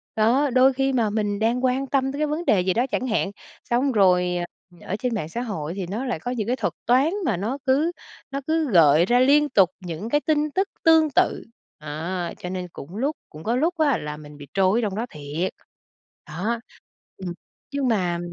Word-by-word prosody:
Đó, 245 +7 +3
đôi 260 +1 +5
khi 270 +1 0
mà 230 -4 +2
mình 205 -1 -1
đang 235 +3 +1
quan 260 +2 0
tâm 270 0 +1
tới 280 - -6
cái 305 - +1
vấn 310 +4 -3
đề 190 -4 +4
gì 185 0 +1
đó 240 +3 +1
chẳng 255 - -1
hạn, 215 -4 0 0.4
xong 260 +3 +2
rồi, 180 -4 +3
ờ, 175 - -2 0.4
ở - - -1
trên 245 -2 -1
mạng 160 -7 -3
xã 235 - -4
hội 175 -9 -4
thì 190 -3 -4
nó 225 +8 -3
lại 240 -10 -2
có 245 +9 -4
những 225 -4 -2
cái 250 - +1
thuật - - -2
toán 265 +7 +3
mà 215 - +1
nó 225 +8 -2
cứ 285 +6 +2 0.4
nó 275 +1 -3
cứ 315 -4 +1
gợi 165 -2 +6
ra 245 +4 +3
liên 290 +3 +4
tục 195 -8 +4
những 180 +4 -6
cái 295 +4 +2
tin 300 -1 +1
tức 390 +1 +2 0.2
tương 320 -1 +5
tự, - - +2 0.4
đó. 165 +4 -4
Cho 180 - -6
nên 180 -1 -4
cũng 165 +7 -9
lúc 285 +6 0
cũng 155 +1 -11
có 235 +2 0
lúc 325 +7 +1
á 295 -5 +3
là 150 0 -6
mình 150 -1 -12
bị 145 -1 -11
trôi 195 +3 +3
ở - - 0
trong 205 -3 -2
đó 225 +3 -2
thiệt. 150 +4 -4 0.8
Đó, 220 +8 -2 0.6
ừm, 180 -2 -5 0.4
nhưng 280 -2 0
mà 180 -6 +1
225 Hz, 225 wpm, -24 LUFS, 180-270 Hz, 0.8 s, gợi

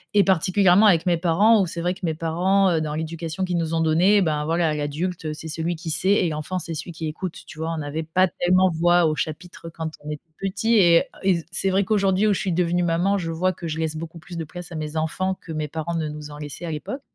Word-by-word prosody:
et 205 - +6
particulièrement 190 +2 +4
avec 170 -4 +4
mes 175 -1 +3
parents 190 +6 +4
où, 190 - 0
c'est 170 0 -6
vrai 175 +2 0
que 190 - -14
mes 160 -2 0
parents, 180 +5 +2
heu, 160 -2 +1
dans 150 -1 -3
l'éducation 165 +3 -3
qu'ils 180 -1 -1
nous 165 -1 -2
ont - - +1
donnée, 175 +6 +4
bah, 155 -4 0
voilà, 165 0 +1
l'adulte, 155 +4 -3
heu, 155 - -2
c'est 155 +1 -8
celui 160 +2 -2
qui 160 0 -6
sait 185 - 0
et 185 -4 +3
l'enfant, 155 +4 -3
c'est 170 - -6
celui 160 +2 -6
qui 160 -1 -5
écoute. 165 +3 -5
Tu 155 - -11
vois, 165 +1 -2
on - - -3
avait 150 +3 -3
pas 185 +4 +2
tellement 185 +2 +2
voix 175 +1 +3
au 155 -1 +1
chapitre 165 +4 -5
quand 160 -1 -4
on 150 - -7
était 150 -1 -6 0.2
petits 220 +4 0
et 175 -5 +6
heu - - -2 0.2
et 180 -3 +2
c'est 190 +2 0
vrai 190 +1 +2
qu'aujourd'hui, 195 -1 +2
où 210 - +4
je - - -2
suis 190 - -1
devenue 175 +1 +1
maman, 175 +4 +1
je 165 -2 -3
vois 185 +3 0
que 170 - -7
je 155 +1 -3
laisse 160 -1 -1
beaucoup 165 +1 -7
plus 175 +2 -11
de 165 - -2
place 175 +3 -9
à - - -6
mes 155 0 -4
enfants 185 +4 -1
que 165 - -10
mes 155 -1 -2
parents 160 +2 -4
ne 160 -2 -1
nous 150 0 -8
en 145 - -9
laissaient 150 +3 -7
à 165 - -4
l'époque. 210 - -5
170 Hz, 270 wpm, -23 LUFS, 160-185 Hz, 0.2 s, et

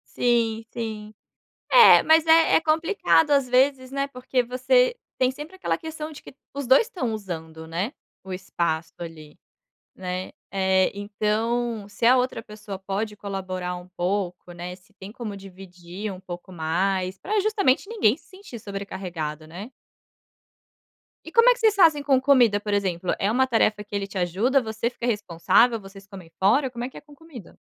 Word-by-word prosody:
Sim, 230 -2 +1
sim. 215 -2 -6 0.6
É, 485 -2 +9
mas 320 0 +5
é 325 0 +5
é - - +4
complicado 320 -1 +2
às 275 -2 +3
vezes, 260 +1 +2
né, 275 0 -1
porque 255 -1 -1
você 480 - +2 0.2
tem 255 0 +2
sempre 300 +7 -10
aquela 375 - -1
questão 315 -1 -7
de 300 - -11
que - - -13 0.2
os 280 -1 -4
2 260 - +6
estão 295 - -3
usando, 160 -6 -7
né, 180 +9 -3 0.3
o 190 - -9
espaço 170 -3 -3
ali, 160 -3 -10 0.6
né. 185 0 -5 0.2
Eh, 190 -1 +2
então, 215 +2 -1
se 205 - -3
a 255 +2 +6
outra 250 -1 -1
pessoa 210 -3 -9
pode 205 +2 -3
colaborar 185 -3 -5
um 180 0 -10
pouco, 180 -1 -2
né, 175 +1 -7
se 190 +3 -26
tem 195 0 -11
como 225 -4 -6
dividir 190 +1 -9
um 185 - -8
pouco 180 0 -9
mais 185 +3 -1
pra 420 - -1
justamente 400 -7 +1
ninguém 350 - +2
se - - -25
sentir 375 - -11
sobrecarregado, 180 -6 -6
né. 185 +8 -9 1.6
E - - -9
como 465 +1 +6
é - - +7
que - - -14
vocês 440 -2 +3
fazem 320 -7 +5
com 275 -2 +3
comida 245 -7 +4
por 210 0 -4
exemplo? 185 -3 -1
É 200 +2 +1
uma 260 +2 +2
tarefa 215 -3 +1
que 205 0 -8
ele 200 -1 -2
te 195 - -8
ajuda? 200 +10 +1
Você 220 0 -2
fica 240 - -7
responsável? 225 +2 +2
Vocês 195 0 -14
comem 190 -5 -12
fora? 250 +8 +3
Como 240 -1 -6
é 250 - -4
que - - -13
é - - -10
com 295 -1 -18
comida? 305 - -13
215 Hz, 175 wpm, -24 LUFS, 190-265 Hz, 1.6 s, É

